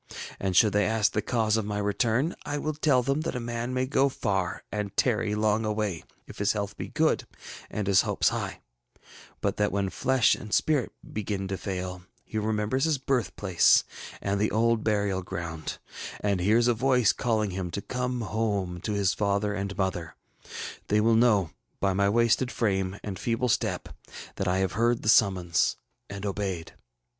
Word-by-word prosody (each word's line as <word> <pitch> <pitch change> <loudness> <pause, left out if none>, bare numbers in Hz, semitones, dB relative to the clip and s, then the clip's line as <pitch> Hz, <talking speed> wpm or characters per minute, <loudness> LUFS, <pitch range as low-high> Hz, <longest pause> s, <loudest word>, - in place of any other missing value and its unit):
And 95 -2 0
should 105 -1 +5
they 105 0 +3
ask 110 -1 +2
the 105 - 0
cause 110 -1 +1
of 110 - -1
my 105 0 -3
return, 115 - +1
I 145 0 -3
will 155 +1 -2
tell 145 -4 +3
f - - -8
hem 135 +3 +1
that 155 - -3
a - - -1
man 120 +1 -3
may 130 0 0
go 135 +1 +2
far 95 -8 -2
and 105 -2 -4
tarry 110 -4 +1
long 105 +1 +1
away, 105 -5 -2 0.2
if - - -12
his 100 0 +2
health 100 -2 -3
be - - -5
good - - +1 0.4
and 105 - -3
his 100 -1 +5
hopes - - +1
high; - - -4 0.8
but 100 - -1
that 105 0 +1
when 100 -1 -1
flesh 130 -2 +3
and 110 - -6
spirit 145 -1 +2 0.2
begin 100 -2 -3
to 95 - -1
fail, 90 -2 -4 0.2
he 110 - -3
remembers 110 +5 0
his 160 -3 +2
birthplace 105 -9 +3 0.4
and 100 0 0
the 105 - +2
old 115 0 +2
burial 100 -3 +1
ground, 85 -3 -5 0.4
and 100 -2 0
hears 110 +6 +3
a 120 - +4
voice 125 -2 +3
calling 110 -4 0
him 90 -1 -3
to 90 - -4
cone 125 +2 -3
home 100 -6 -2
to 105 - -2
his 100 -2 +2
father 100 0 0
and 100 -1 -4
mother. 90 -4 -2 0.7
They 105 - +3
will 115 +2 +4
know, 110 -7 +3 0.3
by 100 -1 +1
my 100 +1 +2
wasted 115 +3 +2
frame 95 -3 0
and 95 -3 -5
feeble 120 +2 0
step, - - 0 0.5
that 95 - -1
I 90 +1 +2
have 95 -1 +1
heard 120 +2 +1
the 110 - +1
summons 95 -6 +3 0.3
and 100 +1 -6
obeyed. 95 -4 -3
105 Hz, 185 wpm, -27 LUFS, 95-115 Hz, 0.8 s, should